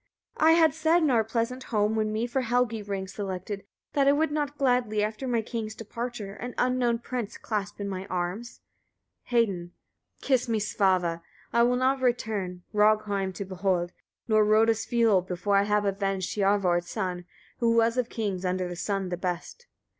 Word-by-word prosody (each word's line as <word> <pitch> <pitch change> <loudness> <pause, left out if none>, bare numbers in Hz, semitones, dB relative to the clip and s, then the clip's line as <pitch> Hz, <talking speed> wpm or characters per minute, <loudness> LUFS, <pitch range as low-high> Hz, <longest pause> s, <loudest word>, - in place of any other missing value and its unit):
42. 315 - +6
I 325 - +6
had 320 -3 +5
said, 320 +2 +3
in 300 - +3
our 230 -3 +4
pleasant 230 +3 -2
home, 210 -1 +1
when 215 -1 +1 0.2
for 245 +2 -1
me 255 - -2
Helgi 240 -2 +1
rings 195 -1 -5
selected, 195 0 -5 0.3
that 280 -1 +3
I - - +7
would 300 +2 +1
not 295 -1 -2
gladly, 245 -6 +2
after 215 +5 -3
my 235 -2 +1
king's 220 -1 -4
departure, 230 -2 -6
an 245 +4 -7
unknown 250 -2 +2
prince 235 -2 -5
clasp 205 -2 -4
in 200 - -3
my 190 0 -5
arms. 185 +6 -4 0.7
Hedin. 195 -8 +1 0.5
43. - - -10
Kiss 255 -3 +2
me, 225 -1 +1
Svava! 185 -5 +1 0.3
I 235 - +4
will 245 +1 +4
not 260 +1 +1
return, 210 -8 -1
Rogheim 210 -2 +2
to 200 - -4
behold, 185 -2 -1 0.3
nor 215 -1 +4
Rodulsfioll, 220 -2 +3
before 185 +3 0
I 200 - +3
have 210 0 +1
avenged 195 -2 -1
Hiorvard's 195 -4 +2
son, 180 -4 -3 0.3
who 230 -1 +3
was 230 0 +3
of 250 -2 0
kings 200 -5 -3
under 185 0 -1
the 175 - -5
sun 195 +1 -2
the 175 - -3
best. 180 - -5
215 Hz, 175 wpm, -27 LUFS, 195-240 Hz, 0.7 s, I